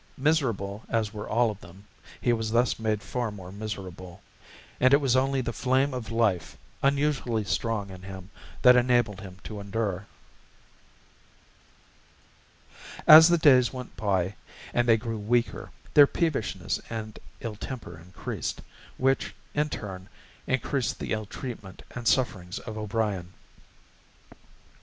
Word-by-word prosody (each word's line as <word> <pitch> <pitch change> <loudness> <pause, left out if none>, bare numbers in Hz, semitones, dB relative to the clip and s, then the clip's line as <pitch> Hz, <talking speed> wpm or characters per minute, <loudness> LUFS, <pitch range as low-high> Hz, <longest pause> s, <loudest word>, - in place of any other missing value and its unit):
Miserable 115 - 0
as 110 -2 0
were 105 -1 -6
all 115 0 +3
of 105 - -10
them, 95 +2 -14 0.4
he 120 - +2
was 110 -1 -1
thus 120 +2 +2
made 110 -2 -1
far 125 -2 -2
more 95 -3 -9
miserable; 95 -4 -7 0.6
and 130 +2 +6
it - - +3
was 135 -4 +2
only 135 +1 +2
the 120 -1 -3
flame 130 +4 +1
of 125 -3 -5
life, 105 -8 0 0.2
unusually 140 -5 +1
strong 105 -1 -2
in 95 -1 -10
him, 95 0 -9 0.3
that 125 0 +9
enabled 120 -5 +2
him 95 -2 -10
to 105 -2 -7
endure. 100 -1 -3 3.0
As 160 +1 +11
the 175 0 +4
days 130 -6 +5
went 125 -2 -8
by 95 -2 0 0.4
and 120 0 +2
they 115 -1 +6
grew 115 0 -4
weaker, 115 +2 0 0.2
their 145 -1 +8
peevishness 155 - -1
and 110 -2 -6 0.2
ill 115 -3 -5
temper 105 -8 -7
increased, 90 +2 -5 0.3
which, 135 +1 +1 0.2
in 150 +1 +1
turn, 95 -6 -7 0.4
increased 130 0 0
the - - -5
ill 110 -1 -3
treatment 105 -8 -8
and 120 -1 -5
sufferings 95 -9 +1
of 110 - -7
O'Brien. 105 -4 -2
110 Hz, 135 wpm, -27 LUFS, 100-125 Hz, 3.0 s, As